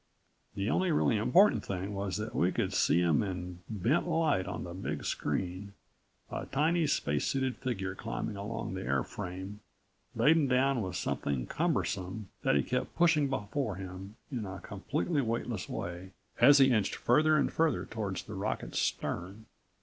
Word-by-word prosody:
The 100 +1 -1
only 185 +8 +2
really 150 -6 +3
important 170 - +4
thing 95 +1 -4
was 100 -2 -2
that 110 +1 -4
we 90 +2 +2
could - - -1
see 85 - +3
him 85 -4 +3
in 90 -3 -4
bent 115 - +1
light 160 - +1
on - - -4
the 85 - -7
big 95 - -4
screen 95 +2 -2 0.6
a - - -4
tiny, 160 +4 +2
spacesuited 130 - 0
figure 95 -7 -3
climbing 95 - -4
along 100 0 -4
the 95 - -4
airframe, 90 +7 -3 0.6
laden 150 +6 +4
down 130 0 +2
with 95 -2 -4
something 70 -8 -1
cumbersome 95 +2 -1
that - - +2
he 70 - +3
kept 125 +1 -2
pushing 160 -4 +4
before 135 -2 -2
him 95 +2 -8 0.2
in 120 -5 -3
a 95 0 -6
completely 145 - -1
weightless 115 -4 -2
way 90 +2 -5 0.3
as 145 0 +8
he 135 -1 +6
inched 105 -4 +1
further 155 +5 +4
and 140 - +1
further 160 -1 +1
toward 105 -4 -4
the 110 - -6
rocket's 100 +2 -2
stern. 95 +5 -2
105 Hz, 155 wpm, -31 LUFS, 95-135 Hz, 0.6 s, as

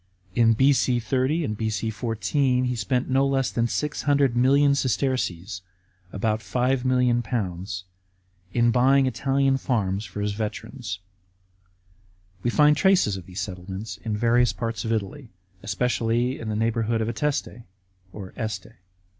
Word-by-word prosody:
In 115 +1 +4
B.C. 130 0 +3
30 130 +7 0
and 110 - -2
B.C. 110 +1 -2
14, 125 +4 0
he 125 -1 -1
spent 125 +2 -1
no 135 +1 +2
less 135 -1 +1
than 120 0 +1
600 145 -1 +1
million 140 +3 +4
sesterces 115 -9 -1 0.5
(about 110 +1 -1
£5,000,000) 120 -7 0 0.7
in 120 -1 +3
buying 135 +3 +4
Italian 135 +2 +1
farms 105 -7 -1
for 105 - -6
his 105 0 -1
veterans. 110 0 -5 1.4
We 120 - 0
find 150 +4 +5
traces 185 - +3
of 95 -2 -9
these 95 +1 -5
settlements 95 +3 -6
in 110 -2 -3
various 120 +2 +3
parts 115 -2 -3
of 115 - -2
Italy, 115 +5 -3 0.3
especially 120 +4 0
in 110 - -5
the 105 - -2
neighbourhood 115 0 0
of 110 - -1
Ateste 120 -2 -2 0.7
(Este). 110 -5 -4
120 Hz, 130 wpm, -25 LUFS, 110-130 Hz, 1.4 s, find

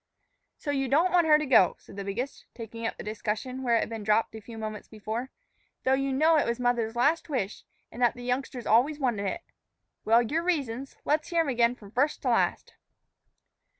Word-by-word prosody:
"So 290 - -3
you 270 -1 0
don't 325 +8 +3
want 345 -2 +4
her 300 -1 +7
to 305 - -2
go," 215 - +5
said - - -15
the 200 - -5
biggest, 230 +8 -5
taking 230 0 -5
up - - -5
the - - -7
discussion 220 +4 -4
where 240 -3 +2
it 230 - +3
had - - -3
been 225 -2 -5
dropped 215 +2 +2
a 220 - -8
few 225 +2 -10
moments 215 -1 -6
before; 220 +4 -5 0.5
"though 260 - +3
you 275 0 +1
know 310 +4 +4
it 295 - +2
was 235 +1 -1
mother's 240 -2 0
last 305 +7 +2
wish, 225 -8 -3 0.3
an' 235 - -10
that 240 -2 +3
the 245 - -9
youngster's 250 0 -3
always 255 +7 +3
wanted 230 -7 0
it. 190 - -3 0.6
Well, 230 +2 +4
your 300 +8 -1
reasons; 275 -7 -2
let's 305 +1 +1
hear 340 -1 +2
'em 315 - -1
again 240 -1 +2
from 205 -4 -14
first 280 +6 0
to - - +1
last." - - +1
245 Hz, 215 wpm, -28 LUFS, 225-280 Hz, 0.6 s, her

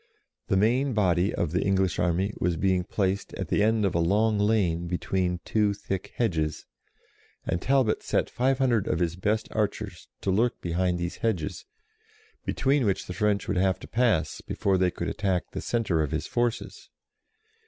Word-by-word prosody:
The 95 - +2
main 125 +7 +2
body 95 -2 +2
of 85 -3 -1
the 90 - +1
English 95 -3 +1
army 90 +4 +1
was 85 -1 0
being 95 0 +2
placed 95 +1 -1
at - - -4
the - - +2
end 110 0 +3
of 95 - 0
a 85 - +1
long 105 +5 +2
lane 95 -6 +1
between 90 0 -1
two 105 -2 +1
thick 95 -1 -5
hedges, 80 -10 -1 0.8
and 85 - -1
Talbot 130 -5 +2
set - - 0
five 130 +2 +1
hundred 120 -6 +2
of - - +1
his 85 -1 0
best 105 +4 0
archers 105 -2 -3
to 95 - 0
lurk 115 +6 +1
behind 90 +1 0
these 85 0 -4
hedges, 95 -9 -2 0.8
between 140 0 +1
which 95 - 0
the 90 - -6
French 105 +2 0
would 100 - -1
have 95 0 +2
to - - -10
pass 110 -10 +1
before 95 -2 0
they 90 -1 +3
could 85 -1 -5
attack 95 -4 -1
the - - -5
centre 110 -9 0
of 75 - -1
his - - -2
forces. 120 -1 -2
95 Hz, 175 wpm, -27 LUFS, 90-110 Hz, 0.8 s, end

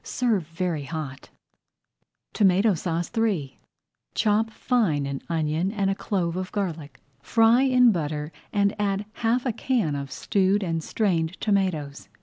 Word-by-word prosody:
Serve 220 -10 0
very 165 -3 -3
hot. 140 -3 -6 1.0
TOMATO 200 +1 +4
SAUCE 170 0 -2
III 195 -12 -1 0.6
Chop 220 +1 +2
fine 215 - 0
an 140 0 -4
onion 160 +3 0
and 200 -3 0
a - - +2
clove 180 -4 -2
of 185 0 -4
garlic. 165 -7 -4 0.2
Fry 225 - +4
in 250 -3 +5
butter 150 -4 -3 0.2
and 200 -1 +2
add 200 0 0
half 240 +3 0
a 245 - 0
can 230 - 0
of 140 -1 -4
stewed 200 0 +1
and 165 -3 -2
strained 180 -5 0
tomatoes. 155 - -1
185 Hz, 135 wpm, -25 LUFS, 160-215 Hz, 1.0 s, in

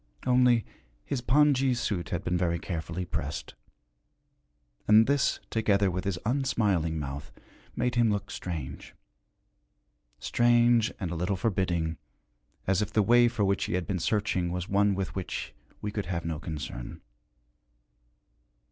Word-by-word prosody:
Only, 125 -2 +4 0.4
his 135 -3 -2
pongee 135 0 +3
suit 100 -8 -2
had 85 +1 -3
been 90 -1 -1
very 85 -1 +1
carefully 85 +1 -4
pressed, 75 -3 -4 1.3
and 110 +1 +7
this, 140 +1 +1
together 100 -3 +2
with 95 +2 -3
his 100 -3 -1
unsmiling 105 - +1
mouth, 70 -1 -5 0.4
made 125 0 0
him 120 -2 +3
look 100 -1 -2
strange 80 -7 -6 1.2
strange 120 - +3
and 90 -4 -3
a - - -3
little 90 +4 -1
forbidding, 90 -5 0 0.7
as 95 +1 +2
if 105 0 -2
the 105 - +3
way 120 +3 +5
for 115 -4 0
which 100 0 +1
he - - -3
had 90 -1 -1
been 90 +3 -2
searching 95 -2 0
was 90 0 -3
one 100 0 +2
with 95 -1 -3
which 90 -9 -5 0.3
we 105 - -2
could 105 -3 -4
have 85 -2 -3
no 80 -2 -3
concern. 75 -6 -6
100 Hz, 140 wpm, -28 LUFS, 85-115 Hz, 1.3 s, and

